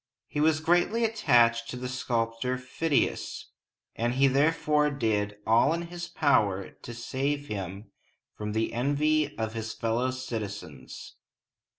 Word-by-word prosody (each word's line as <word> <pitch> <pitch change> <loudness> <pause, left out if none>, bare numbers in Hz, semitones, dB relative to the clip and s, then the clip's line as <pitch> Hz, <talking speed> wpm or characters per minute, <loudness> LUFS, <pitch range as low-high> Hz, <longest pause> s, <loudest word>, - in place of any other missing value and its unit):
He 150 - -4
was 155 +1 +3
greatly 175 +8 +2
attached 120 - +3
to 125 - -5
the 125 0 -4
sculptor 125 0 -1
Phidias, 130 +4 -1 0.5
and 120 +2 -1
he 135 +1 +4
therefore 150 +2 +3
did 105 -7 -1
all 115 +7 +4
in 170 - -3
his 175 0 -5
power 105 - +1
to 120 - -10
save 140 +4 -2
him 100 0 -5 0.4
from 105 0 -4
the 110 +1 -1
envy 145 +4 +1
of 110 -1 -2
his 110 -1 -4
fellow 115 +2 0
citizens. 105 - -6
125 Hz, 130 wpm, -28 LUFS, 110-145 Hz, 0.5 s, he